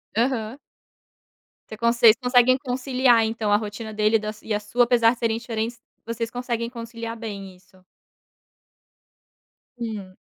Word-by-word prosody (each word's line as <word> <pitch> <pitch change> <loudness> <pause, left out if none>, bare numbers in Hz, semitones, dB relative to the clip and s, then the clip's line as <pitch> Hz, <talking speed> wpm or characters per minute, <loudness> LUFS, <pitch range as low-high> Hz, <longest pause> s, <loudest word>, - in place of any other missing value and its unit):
Aham. 235 +1 -1 1.1
Vocês 220 - -8
conse 235 0 +1
vocês 230 -2 +8
conseguem 250 0 +4
conciliar 255 -3 +2
então 220 -2 -2
a - - +6
rotina 215 +1 -6
dele 215 +1 +2
e - - +4
da 215 0 -4
e 220 - -4
a - - 0
sua, 240 +3 +1
apesar 235 -2 +4
de - - -13
serem 225 -1 0
diferentes, 230 0 -4 0.2
vocês 230 0 -4
conseguem 240 -2 -3
conciliar 230 -1 -7
bem 200 -4 -7
isso? 185 0 -24 1.9
Hum. 210 -5 -6
230 Hz, 145 wpm, -24 LUFS, 215-240 Hz, 1.9 s, vocês